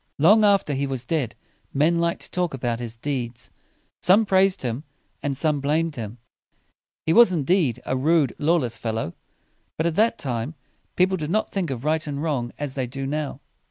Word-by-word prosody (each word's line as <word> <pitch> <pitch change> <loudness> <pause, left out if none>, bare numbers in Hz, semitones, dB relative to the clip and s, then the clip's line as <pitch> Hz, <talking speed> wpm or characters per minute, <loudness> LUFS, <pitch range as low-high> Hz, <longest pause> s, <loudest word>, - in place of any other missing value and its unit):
Long 205 +9 +6
after 200 -7 +3
he 140 +1 -1
was 130 -2 -3
dead, 135 -5 -1 0.4
men 160 +5 +3
liked 170 0 0
to - - -8
talk 180 -5 -1
about 120 -2 -2
his 115 -1 -6
deeds. 120 -3 -4 0.5
Some 200 +5 +5
praised 190 -2 +3
him, 125 +3 -3 0.4
and 140 -2 -2
some 150 0 +1
blamed 155 +3 0
him. 115 -1 -6 0.9
He 160 - +3
was, 235 0 +7
indeed, 155 - +1
a 130 - -1
rude, 145 0 +2
lawless 150 -6 +1
fellow; 110 -6 -3 0.6
but 160 - 0
at 170 - +1
that 230 +2 +3
time, 125 +3 -3 0.4
people 185 +1 +3
did 155 -3 -4
not 215 +5 0
think 190 -5 -1
of 130 0 -5
right 155 0 0
and 140 -1 -3
wrong 140 -6 -1
as 145 -2 -4
they 130 -2 -2
do 135 +2 -5
now. 150 +1 -3
145 Hz, 185 wpm, -24 LUFS, 130-170 Hz, 0.9 s, was